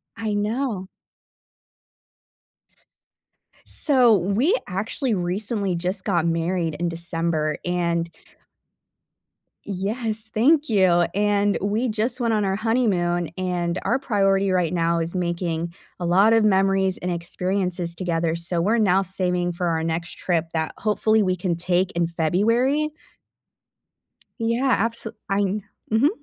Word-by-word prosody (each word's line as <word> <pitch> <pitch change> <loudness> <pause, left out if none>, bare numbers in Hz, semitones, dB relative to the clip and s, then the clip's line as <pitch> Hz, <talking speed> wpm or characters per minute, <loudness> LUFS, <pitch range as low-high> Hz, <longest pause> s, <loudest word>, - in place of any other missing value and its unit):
I 220 -2 -3
know. 210 -1 -1 2.8
So, 250 -7 +3
we 205 - +2
actually 220 +6 -2
recently 195 +1 -1
just 185 +3 -2
got 175 -5 +1
married 165 -1 0
in 175 0 0
December, 165 -2 -2
and 170 -1 0 1.6
yes, 215 +3 -3
thank 290 +7 +3
you. 185 -5 +4
And 205 0 +2
we 215 +5 0
just 225 +4 -1
went 235 -2 +1
on 210 -2 +1
our 190 0 0
honeymoon, 195 -7 +1
and 180 -1 -1
our 260 - +1
priority 195 -6 +2
right 180 -2 +1
now 170 -1 +1
is 165 +2 -3
making 170 -1 -2 0.3
a 175 - -3
lot 195 +6 +5
of 225 -1 +4
memories 195 -2 +2
and 180 - -2
experiences 180 0 -2
together, 165 -2 -1
so 170 0 -2
we're 215 +7 +2
now 195 -4 +3
saving 180 -1 -1
for 175 +1 -2
our 160 -1 0
next 165 +1 -3
trip 165 -2 -1
that 160 -1 -1
hopefully 215 0 +2
we 185 -1 +1
can 180 -1 -1
take 180 +2 0
in 170 0 +1
February. 230 - +1 1.5
Yeah, 230 0 +2
abso 230 -1 -5 0.2
Um, 200 +1 0 0.3
mhm. 225 +7 +4
190 Hz, 125 wpm, -23 LUFS, 175-215 Hz, 2.8 s, lot